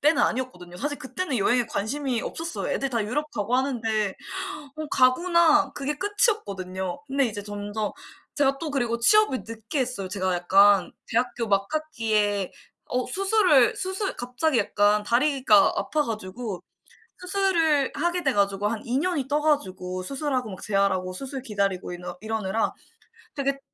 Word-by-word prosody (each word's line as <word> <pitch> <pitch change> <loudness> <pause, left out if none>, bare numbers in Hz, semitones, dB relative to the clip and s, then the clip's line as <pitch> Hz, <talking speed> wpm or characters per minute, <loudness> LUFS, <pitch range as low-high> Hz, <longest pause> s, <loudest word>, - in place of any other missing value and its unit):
때는 300 +3 +4
아니었거든요. 180 -9 -2
사실 290 +8 -3
그때는 290 +1 -3
여행에 240 +3 +2
관심이 250 +3 -2
없었어요. 330 +1 -4
애들 275 - -1
다 230 -3 0
유럽 295 +8 -2
가고 225 +3 0
하는데 225 -6 0 0.6
'어 310 - -4
가구나,' 335 +5 +4
그게 285 +1 -2
끝이었거든요. 200 - -1
근데 275 -1 +2
이제 205 -2 -5
점점 205 +1 -4 0.5
제가 275 -2 +2
또 310 0 -4
그리고 240 -4 0
취업을 345 - +4
늦게 230 +6 -4
했어요. 245 -7 -2
제가 185 -1 -1
약간 195 +2 +4 0.2
대학교 235 -1 -1
막학기에 210 - 0 0.3
어 250 0 -1
수술을 375 - +4
수술 380 +1 -2
갑자기 250 +3 0
약간 205 +1 +2
다리가 245 -4 +4
아파 305 -1 0
가지고 215 -2 -5 0.6
수술을 355 -7 +2
하게 345 +3 0
돼 270 - +2
가지고 200 -1 +1
한 215 0 -2
2 245 +2 0
년이 320 -6 -1
떠 295 - +2
가지고 185 -11 -1
수술하고 265 0 -2
막 185 - -9
재활하고 195 -3 0
수술 265 +5 -6
기다리고 200 -5 -1
이너 180 0 -7
이러느라 220 -1 -1 0.6
되게 275 -1 -1
245 Hz, 340 characters per minute, -25 LUFS, 205-295 Hz, 0.6 s, 때는